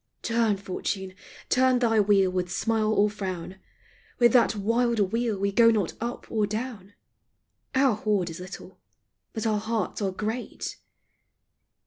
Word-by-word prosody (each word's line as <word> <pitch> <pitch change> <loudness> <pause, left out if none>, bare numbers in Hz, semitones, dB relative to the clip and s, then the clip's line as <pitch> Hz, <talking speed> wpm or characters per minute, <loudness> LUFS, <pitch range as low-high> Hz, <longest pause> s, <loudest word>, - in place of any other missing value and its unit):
Turn, 230 -3 +1
Fortune, 190 0 -4 0.3
turn 255 0 +3
thy 225 -3 +2
wheel 195 -2 +4
with 180 -1 -2
smile 220 -1 +1
or 210 -1 +4
frown; 190 -3 -5 0.6
With 240 -2 +5
that 240 -2 +4
wild 230 -1 +1
wheel 230 -3 0
we 200 +1 0
go 230 +3 +6
not 210 -6 +1
up 240 +1 -4
or 215 -2 +1
down; 215 -3 -5 0.8
Our 265 -2 +4
hoard 205 -4 0
is 165 - -8
little, 180 0 -10 0.5
but 220 -1 -4
our 215 -2 +1
hearts 220 0 -2
are 195 - +1
great. 220 +5 -4
215 Hz, 140 wpm, -26 LUFS, 195-230 Hz, 0.8 s, go